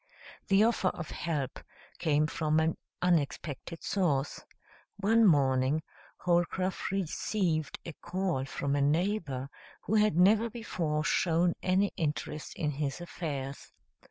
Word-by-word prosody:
The 195 0 +5
offer 225 -4 +2
of 175 -3 -3
help 145 -6 -3 0.4
came 150 -2 +2
from 155 0 +1
an 160 0 +1 0.3
unexpected 165 -1 -1
source. 150 -8 0 0.5
One 220 +2 +4
morning 135 -1 +3 0.3
Holcroft 180 +1 0
received 180 -3 -1
a 170 - -6
call 175 -5 -2
from 140 +1 -2
a 145 - +1
neighbor 150 -3 0 0.4
who - - -2
had 210 -6 +4
never 210 +5 +5
before 170 -10 -2
shown 170 +2 +2
any 190 +2 +2
interest 150 0 -3
in 150 -2 -1
his 145 +2 -3
affairs. 145 -6 -5
165 Hz, 120 wpm, -30 LUFS, 150-190 Hz, 0.5 s, The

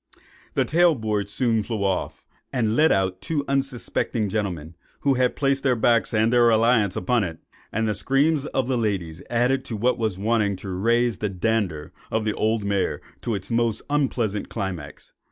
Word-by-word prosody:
The - - +2
tail 170 0 +4
board 105 -4 -2
soon 115 0 +1
flew 110 -1 -3
off, 95 -2 -2 0.3
and 115 -4 0
let 155 +4 +4
out 95 -1 0
two 145 -3 -2
unsuspecting 135 -5 -1
gentlemen, 90 -6 -3 0.3
who 140 - +3
had 125 -1 +1
placed 135 -1 +1
their 130 -3 +3
backs 115 -1 +2
and 110 +2 +2
their 120 -1 +5
reliance 115 -3 +3
upon 115 +4 +1
it; 80 -4 -4 0.3
and 110 +1 0
the 105 - +1
screams 140 +6 +1
of 130 -2 -1
the 130 -2 0
ladies 95 -7 -2
added 125 +3 +1
what 120 +3 0
was 110 -5 -1
wanting 105 -1 +1
to 95 +1 -8
raise 115 +4 +1
the 105 - -1
"dander" 95 -5 -1 0.2
of 110 0 -1
the 105 - 0
old 110 0 0
mare 100 -1 0 0.2
to 115 - -2
its 100 +3 -7
most 115 -2 +1
unpleasant 120 -8 0
climax. 85 -8 -6
110 Hz, 175 wpm, -24 LUFS, 100-125 Hz, 0.3 s, their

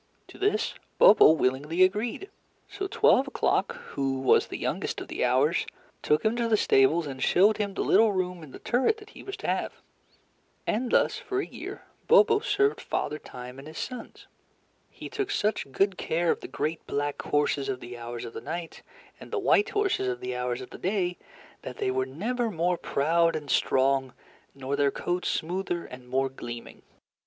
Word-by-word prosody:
To - - -13
this 415 +2 +1 0.2
Bobo 205 - +8
willingly 150 +4 +2
agreed. 215 - 0 0.4
So 395 -1 -5
Twelve 275 -7 +4
O'Clock, 275 - 0
who 135 -1 -1
was 130 - +4
the - - -5
youngest - - -2
of - - -8
the - - -2
Hours, - - +2 0.3
took 150 +6 +1
him 220 +2 +2
to 235 -1 +1
the 220 -1 +3
stables 155 +1 +3
and 135 -2 -7
showed 200 +9 +4
him 200 -2 -2
the - - -1
little 225 -1 +5
room 180 -2 -2
in 155 - -11
the - - -10
turret 260 - +1
that 425 0 -14
he - - -12
was 395 +2 -7
to - - -6
have. - - -1 0.9
And 240 +3 -1
thus - - +3
for 385 - -3
a 395 - -1
year - - -8 0.2
Bobo 465 -3 +6
served 415 -1 +1
Father 150 +1 -2
Time 125 +1 -10
and 140 - -11
his 155 - -10
sons. 250 -3 -7 0.6
He - - -9
took 405 -1 -3
such 210 - -1
good 195 +5 +1
care 165 +1 +1
of - - -2
the - - -8
great 155 +3 -3
black 145 0 -2
horses 145 -2 0
of 130 -1 -2
the 120 0 -9
Hours 120 0 -6
of 115 - -8
the - - -6
Night, 170 0 -6 0.4
and - - -11
the 455 - -2
white 410 +1 +3
horses 405 - 0
of 125 -1 -2
the 125 0 -4
Hours 125 0 -2
of 130 - -10
the - - -10
Day, 180 -2 -1 0.4
that 125 - -8
they 130 - 0
were 130 0 -1
never 230 - -2
more 175 -1 0
proud 165 +4 +2
and 150 -3 -4
strong, 135 -1 +2 0.4
nor 135 +1 -3
their 140 0 +3
coats 175 +5 -2
smoother 175 +1 -2
and 125 -1 -11
more 135 +1 +1
gleaming. 120 -2 -9
165 Hz, 190 wpm, -27 LUFS, 135-225 Hz, 0.9 s, Bobo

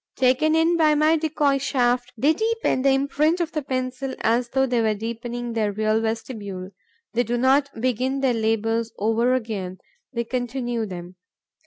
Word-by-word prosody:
Taken 260 +5 +3
in 330 +1 +3
by 310 -2 +4
my 305 +2 +4
decoy 300 -3 +1
shaft, 245 -2 0
they 285 +7 +3
deepen 445 - 0
the 275 - +3
imprint 280 +5 +2
of 335 -2 -1
the 305 - -2
pencil 260 0 -3
as 235 +2 +1
though 265 +1 +2
they 245 -2 +1
were 220 -1 +1
deepening 235 +2 -5
their 215 -2 0
real 215 +2 +1
vestibule. 210 -4 -4 0.4
They 235 - +2
do 240 0 -1
not 270 +3 +3
begin 255 +3 0
their 265 -2 +2
labours 225 0 0
over 225 +4 +2
again; 205 -7 -4 0.3
they 235 -3 -2
continue 240 -1 -2
them. 180 -1 -8
245 Hz, 165 wpm, -23 LUFS, 225-275 Hz, 0.4 s, by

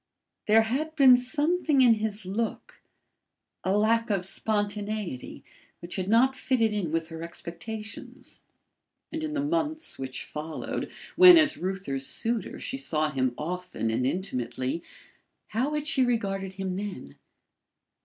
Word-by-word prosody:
There 220 +1 +6
had 295 +8 -2
been 265 -4 +8
something 295 +3 +1
in 245 -3 +7
his 215 -2 -3
look 215 +5 -4 0.8
a 190 - 0
lack 230 +2 +2
of 195 -3 0
spontaneity 205 - -3 0.4
which 175 +1 -8
had 185 -1 -2
not 255 +4 +4
fitted 230 -5 +1
in 190 -7 -2
with 165 0 -1
her 165 -1 -7
expectations. 210 +6 -8 0.7
And 320 0 -4
in 305 -1 -3
the 285 -1 -1
months 315 0 -1
which 130 -1 -5
followed, 155 +1 -5 0.2
when 360 -1 +10
as 310 -1 +4
Reuther's 180 -8 -3
suitor 230 -1 -1
she 270 - -5
saw 155 - 0
him 130 -3 0
often 180 -7 -3
and 120 +3 0
intimately 130 -3 -2 0.7
how 260 +8 0
had 300 -1 -2
she 275 - +2
regarded 195 -6 -1
him 190 0 -3
then? 185 - -6
210 Hz, 135 wpm, -27 LUFS, 170-255 Hz, 0.8 s, when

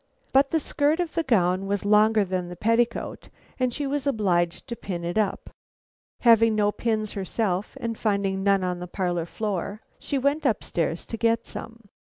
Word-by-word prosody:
But 275 +1 +5
the 325 - +2
skirt 295 +2 +1
of 345 -3 -2
the 335 - +1
gown 195 - +2
was 200 0 -1
longer 210 0 +4
than 180 -1 -3
the 180 - -7
petticoat 230 +4 0 0.3
and 255 -1 +1
she 285 +4 -3
was 285 0 -2
obliged 180 -9 +1
to 235 - -3
pin 180 -6 -5
it 175 +1 -3
up. 215 -3 -1 0.7
Having 230 -2 +5
no 205 -1 +2
pins 215 -1 -1
herself, 195 0 -2
and 230 -1 -3
finding 200 -3 0
none 195 -1 +3
on 180 -1 -2
the 180 - -6
parlor 175 -2 -2
floor, 205 +1 -3 0.2
she 280 - -2
went 280 +4 +1
up 255 -7 +1
stairs 165 0 -2
to 225 - -5
get 230 0 +1
some. 230 0 -8
215 Hz, 185 wpm, -25 LUFS, 185-235 Hz, 0.7 s, But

